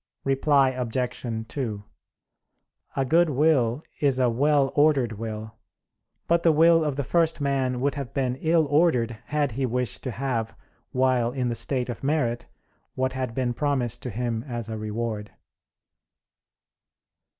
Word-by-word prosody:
Reply 135 0 +3
Obj. 120 -2 -3
2: 110 -8 -4 1.1
A 135 - +1
good 165 +5 +4
will 140 -3 +2 0.2
is 140 -3 +2
a 125 -2 +3
well 140 +2 +2
ordered 145 -5 +3
will; 110 0 -6 0.7
but 170 0 +3
the 165 - +5
will 165 +1 +5
of 150 -3 -1
the 140 - -1
first 165 +3 +1
man 135 -3 0
would 140 +1 +1
have 140 -4 -5
been 130 -2 -1
ill 160 +2 +2
ordered 140 -7 +2
had 145 -2 0
he 130 +4 -1
wished 125 -1 -1
to - - -1
have, 120 -2 -3 0.3
while 125 -2 +2
in 125 -1 -1
the - - -1
state 125 +1 -1
of 120 +1 -6
merit, 135 -5 0 0.5
what 130 0 0
had 130 -3 -3
been 125 -2 0
promised 130 -3 -1
to 125 - -5
him 115 0 -2
as 120 -3 -5
a 110 - -4
reward. 110 0 -4
130 Hz, 150 wpm, -25 LUFS, 120-145 Hz, 1.1 s, the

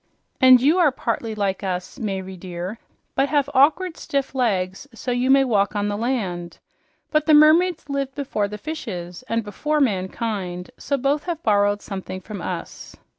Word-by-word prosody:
And 255 -1 +8
you 300 +8 +3
are 320 -5 +5
partly 230 -3 -3
like 200 -2 -1
us, 185 +6 -4
Mayre 190 -4 -4
dear, 180 +4 -6 0.3
but 275 +1 +1
have 290 -2 +2
awkward 320 +6 +3
stiff 275 -1 -2
legs 195 -4 -1
so 250 - -4
you 245 +1 +1
may 270 0 +6
walk 210 -5 +1
on 205 0 0
the 205 - -1
land. 195 -8 -2 0.5
But 305 -1 +1
the 310 - +7
mermaids 315 +2 +5
lived 275 -1 -3
before 255 -8 -2
fishes 210 - -6
and 230 0 0
before 300 +9 -1
mankind, 190 -5 -2
so 280 - -1
both 275 +3 0
have 335 -2 -4
borrowed 205 -1 +2
something 190 -1 -6
from 200 0 -8
us." 175 -2 -6
230 Hz, 165 wpm, -22 LUFS, 190-280 Hz, 0.5 s, And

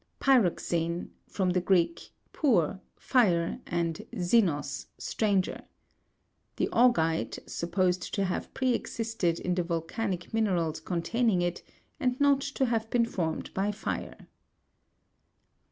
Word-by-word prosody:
Py'roxene 175 -8 +2 0.2
(from 185 -2 0
the 180 0 +1
Greek, 180 - +1 0.2
pur, 195 - +2 0.2
fire, 180 -10 +2
and 165 -1 -1
zenos, 175 -7 +1
stranger). 200 -4 0 0.9
The - - 0
augite, 165 -10 +3
supposed 180 +1 0
to 200 - +1
have 180 - -3
pre 260 -1 +2
existed 225 -8 -1
in 180 - -1
the 180 - +1
volcanic 175 +3 -3
minerals 180 -9 +1
containing 180 +4 0
it, 175 0 -2 0.4
and 255 -2 0
riot 285 -1 +4
to 275 -1 -1
have 225 -2 -1
been 235 -1 +3
formed 165 -8 -3
by 195 +2 0
fire. 210 +1 -5
185 Hz, 115 wpm, -29 LUFS, 170-230 Hz, 0.9 s, riot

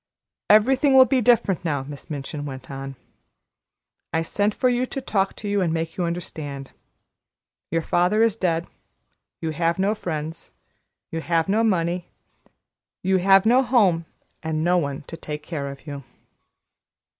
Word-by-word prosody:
"Everything 265 +6 +5
will 260 -1 +9
be 265 - +1
very - - +2
different 195 -5 -3
now," 145 -5 -1
Miss 145 +3 -10
Minchin 145 0 -5
went 135 -2 -8
on. 135 0 -6 1.2
"I 165 0 0
sent 205 +5 0
for 255 - +2
you 250 +1 +1
to 270 - -4
talk 195 -7 0
to 210 - -7
you 205 -1 +1
and 170 -3 +1
make 165 0 -2
you 180 - -1
understand. 150 -5 -5 1.0
Your 165 0 0
father 180 +8 +2
is 230 -3 +2
dead. 170 -5 0 0.8
You 160 -1 -2
have 165 +2 0
no 195 +2 +2
friends. 160 -5 -5 0.6
You 165 - -3
have 165 -1 +1
no 215 +3 +2
money. 175 -4 0 1.0
You 190 0 +3
have 195 +2 +5
no 245 +4 +5
home 200 -11 +3 0.4
and 160 -1 -2
no 180 +1 +3
one 140 -3 -3
to 165 - -9
take 150 -2 -7
care 150 -3 -4
of 140 +1 -10
you." 140 -2 -7
170 Hz, 160 wpm, -23 LUFS, 155-205 Hz, 1.2 s, will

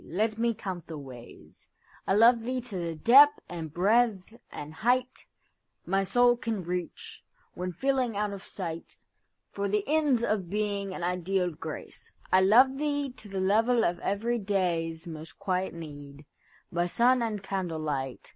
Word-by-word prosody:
Let 215 +5 -1
me 235 -1 +1
count 190 -6 -6
the 160 - -7
ways.I 130 +7 -8
love 230 +2 +6
thee 255 +3 -2
to 240 -5 -7
the 170 -2 -3
depth 280 - +7
and 165 -3 -6
breadth 210 +3 +2 0.2
and 150 +1 -8
heightMy 230 -4 -3
soul 245 +2 +4
can 225 -5 -3
reach, 180 0 -5 0.3
when 180 0 -4
feeling 255 0 0
out 210 -1 -1
of 195 - -7
sightFor 185 +2 -7
the 210 0 +1
ends 290 -5 +2
of 205 -6 -1
being 200 -1 -2
and 175 - -6
ideal 180 +1 0
grace.I 160 +3 -3
love 255 +8 +5
thee 290 -2 -1
to 215 - -10
the 195 -1 -3
level 225 +5 +3
of 175 0 -1
every 230 +5 -1
dayâsMost 165 -5 -2
quiet 185 -1 -2
need, 145 -3 -10 0.5
by 175 +1 0
sun 245 +6 +3
and 215 -4 -2
candle 190 -4 -3
light. 135 -4 -4
195 Hz, 145 wpm, -28 LUFS, 170-235 Hz, 0.5 s, depth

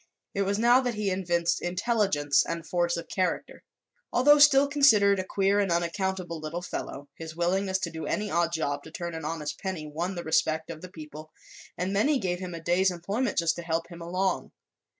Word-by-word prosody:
It 200 - -1
was 200 +1 0
now 240 +3 +5
that 245 -3 -2
he 210 -2 -1
evinced 175 -2 0
intelligence 185 - +1
and 165 -1 -5
force 175 -1 0
of 170 - -6
character. 185 -1 -2 0.5
Although 290 +4 +5
still 285 -1 +7
considered 220 -9 +5
a - - -1
queer 195 +1 +1
and 195 -3 +1
unaccountable 175 0 -1
little 155 +3 -5
fellow, 145 -4 -6
his 160 -1 -9
willingness 190 +3 +1
to 170 - -2
do 160 0 -6
any 210 -1 -2
odd 170 -1 +1
job 145 -3 -2
to - - -9
turn 170 0 -5
an 160 -2 -6
honest 155 -2 -4
penny 185 -5 -4
won 170 +5 -4
the 175 - -5
respect 160 0 0
of 160 -1 -9
the 185 - -9
people 155 -2 -10 0.5
and 185 +2 -2
many 275 +9 +3
gave 180 -6 -2
him 180 -2 -6
a - - -6
day's 175 +3 +2
employment 200 +8 -2
just 165 -1 +2
to - - -4
help 165 0 -2
him 170 -1 -10
along. 185 +3 -1
175 Hz, 200 wpm, -27 LUFS, 165-200 Hz, 0.5 s, still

